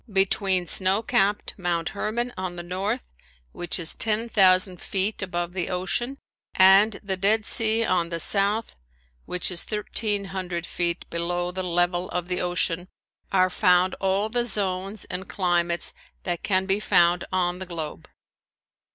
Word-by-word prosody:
Between 190 -1 +2
snow 190 +5 +3
capped 205 -1 +1
Mount 170 -2 -1
Herman 235 +4 -2
on 185 -1 -5
the 175 - -6
north, 185 - -2 0.5
which 175 -1 -2
is 165 -3 +2
ten 225 +1 -1
thousand 185 -3 +3
feet 200 +3 0
above 175 -2 -3
the 185 -2 -2
ocean, 190 +9 -2 0.4
and 195 +3 +6
the 195 -1 -1
Dead 210 +3 +2
Sea 225 0 +3
on 175 -4 0
the 170 -1 -3
south, 205 +5 +1 0.5
which 180 +1 0
is 175 - -1
thirteen 210 -1 -2
hundred 175 -3 -4
feet 175 0 -2
below 175 +1 -1
the 185 +1 -4
level 175 0 0
of 180 0 -4
the 180 - -1
ocean, 175 0 0 0.4
are 185 -1 +3
found 180 -1 +3
all 195 +2 +1
the 240 +2 -1
zones 195 -1 0
and 185 +2 -6
climates 175 -2 0 0.3
that 175 -2 -2
can 190 -1 0
be 195 +1 +1
found 175 -4 +3
on 180 -1 0
the 190 - -7
globe. 160 - -6
185 Hz, 150 wpm, -25 LUFS, 175-200 Hz, 0.5 s, and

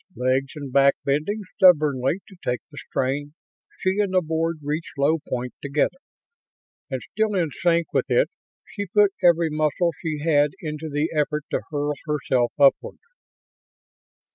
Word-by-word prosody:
Legs 130 +2 0
and 140 -4 -7
back 140 0 +5
bending 150 +10 0 0.2
stubbornly 155 -4 +4
to 195 - -15
take 125 -1 -1
the 145 - -9
strain, 140 +3 -2 0.4
she 190 +2 0
and 200 -2 0
the 185 - +5
board 165 +1 -1
reached 150 +2 -4
low 150 +4 +2
point 125 0 -3
together, 145 - 0 0.9
and, 130 -3 -4
still 215 0 0
in 170 -5 0
sync 170 +1 0
with - - 0
it, - - +2 0.3
she 205 -2 -6
put 205 +1 +3
every 170 -2 +4
muscle 155 +3 +1
she 155 -3 -3
had 145 -2 +3
into 155 -1 -5
the 145 +2 -1
effort 150 0 0
to - - 0
hurl 145 -1 -1
herself 130 -5 +1
upward. 140 -1 +3
150 Hz, 150 wpm, -23 LUFS, 140-170 Hz, 0.9 s, back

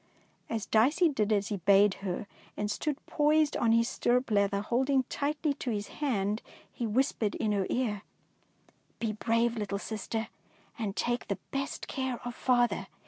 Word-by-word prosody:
As 225 -2 -2
Dicey 295 +11 +4
did 220 -7 0
as 205 -1 +1
he 205 - -1
bade 195 +2 +5
her, 195 +1 -3 0.3
and 210 0 -1
stood 295 +6 -1
poised 300 0 +3
on 230 - +2
his 230 0 +4
stirrup 250 -1 +1
leather, 200 -1 +2
holding 260 +5 +2
tightly 295 +1 0
to 265 - -5
his 205 -3 -2
hand, 215 -6 0 0.3
he 235 - -2
whis 260 +6 +2
pered 215 -3 -1
in 215 - 0
her 200 -2 +1
ear, 220 -5 0 0.4
— - - -39
'' - - -33
Be 225 -2 0
brave, 230 +2 +1
little 205 -2 -2
sister, 220 +2 -4 0.5
and 210 -4 -3
take 240 0 -1
the 200 - -1
best 275 0 -3
care 260 -1 -2
you - - -4
can 245 - -6
of - - -7
father. 240 -7 +1
230 Hz, 185 wpm, -30 LUFS, 205-260 Hz, 0.5 s, bade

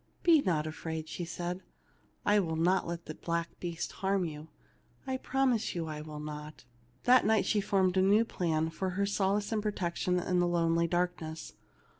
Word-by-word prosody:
"Be 335 -4 +6
not 160 - +1
afraid/' 160 0 -5 0.2
said 175 +2 -4 0.6
she. 205 - +4
"Ill 170 -6 +2
not 175 +4 +2
let 170 0 -5
the 155 - -6
black 170 +1 -2
beast 170 -1 -4
harm 195 -1 0
you; 155 -1 -7 0.6
I 260 -1 -1
promise 260 -6 0
you 170 -2 -2
I 155 -1 -5
will 150 -1 -7
not." 150 0 -7 0.4
That 255 +1 +6
night 220 0 +3
she 210 - +2
formed 190 -2 +2
a - - +5
new 205 +4 +5
plan 160 -6 -1
for 190 +3 -2
her 200 - +2
sol 200 0 +1
ace 210 +1 -4
and 220 -1 +1
protection 180 -3 -1
in 180 0 0
the 175 - +3
lonely 170 -1 +2
darkness. 170 -2 -2
175 Hz, 180 wpm, -31 LUFS, 160-200 Hz, 0.6 s, Be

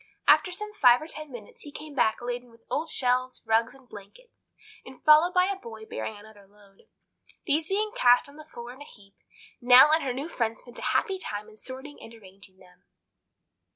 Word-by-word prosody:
After 365 - +5
some 420 +4 -5
five 250 -11 +5
or 310 - -8
ten 305 -2 -8
minutes 235 -5 -12
he 290 - -11
came 300 +1 -9
back 240 -3 +1
laden 245 0 -5
with 230 0 -23
old 320 +3 -2
shelves, 255 -1 0
rugs, 225 +3 +1
and 265 -2 -20
blankets, 215 - -14 0.5
and 260 -1 -13
followed 310 +3 +6
by 365 0 +3
a 395 +1 -2
boy 220 -5 -10
bearing 220 -1 -6
another 205 -1 -16
load. 200 -1 -24 0.6
These 310 +1 0
being 420 +2 -1
cast 245 - +4
on 280 - -16
the 310 - -11
floor 240 -5 -10
in 265 - -16
a - - -9
heap, 200 -6 -17 0.5
Nell 250 +4 +8
and 320 +1 +4
her 265 - -2
new 270 +5 -5
friend 230 -8 -2
spent 245 - -10
a - - -2
happy 385 -3 -2
time 210 - -5
in 215 - -17
sorting 265 +5 -10
and 225 - -12
arranging 195 -2 -16
them. 180 -1 -22
250 Hz, 205 wpm, -26 LUFS, 220-305 Hz, 0.6 s, Nell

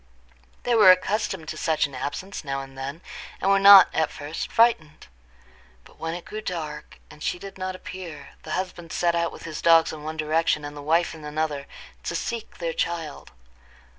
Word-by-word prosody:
They 245 - +1
were 215 -5 +7
accustomed 185 -2 +2
to - - -5
such 160 -2 +1
an 140 - -8
absence 170 +10 -5
now 135 -1 -3
and 135 0 -13
then, 140 +5 -6 0.4
and 195 - +2
were 195 - +5
not 195 -1 +10
at 160 -1 +1
first 150 +2 -6
frightened; 225 -10 +2 0.8
but - - -20
when 165 +1 -3
it 175 - -8
grew 215 +1 -6
dark 155 -6 -6
and 150 - -15
she - - -1
did 195 +2 -10
not 185 0 -3
appear, 170 -6 -9
the - - -6
husband 175 -3 -5
set 170 -1 +1
out 170 0 0
with - - -11
his 155 -2 -6
dogs 165 -1 +5
in 155 - -8
one 155 +1 -6
direction, 155 -1 +1
and 145 0 -7
the 145 - -8
wife 165 +4 +1
in 160 -1 -11
another, 150 -2 -3 0.3
to - - -4
seek 235 -2 -4
their 165 -2 -3
child. 165 -4 -4
165 Hz, 195 wpm, -25 LUFS, 150-185 Hz, 0.8 s, not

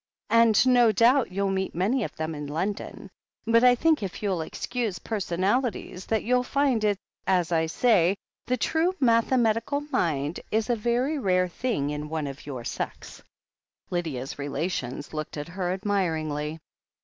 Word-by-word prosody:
"And 230 -2 +5
no 245 -3 +5
doubt 235 +3 +4
you'll 195 +1 0
meet 190 -2 -2
many 215 +8 +1
of - - -5
them 160 0 -3
in 150 -1 -6
London. 185 +8 -4 0.3
But 230 +1 +4
I 250 0 +7
think, 315 +3 +2
if 195 +1 -5
you'll 190 -5 0
excuse 225 +4 -3
personalities, 195 +1 -1
that 220 -1 0
you'll 250 +2 +2
find 260 -3 +1
it's 205 -2 +1 0.3
as 180 -3 +2
I 160 -1 +2
say 190 -1 +3 0.2
— - - -47
the 255 - +1
true 335 +9 +1
mathematical 230 +1 +2
mind 150 - 0
is 220 +2 0
a - - +3
very 245 +7 0
rare 185 -5 +2
thing 175 - -2
in 150 0 -5
one 155 -1 -2
of 140 +1 -8
your 130 -4 -5
sex." - - -6 0.7
Lydia's 150 -7 -3
relations 145 -2 -3
looked 155 0 -5
at 145 +3 -5
her 180 0 -2
admiringly. 160 -6 -1
195 Hz, 160 wpm, -26 LUFS, 160-235 Hz, 0.7 s, I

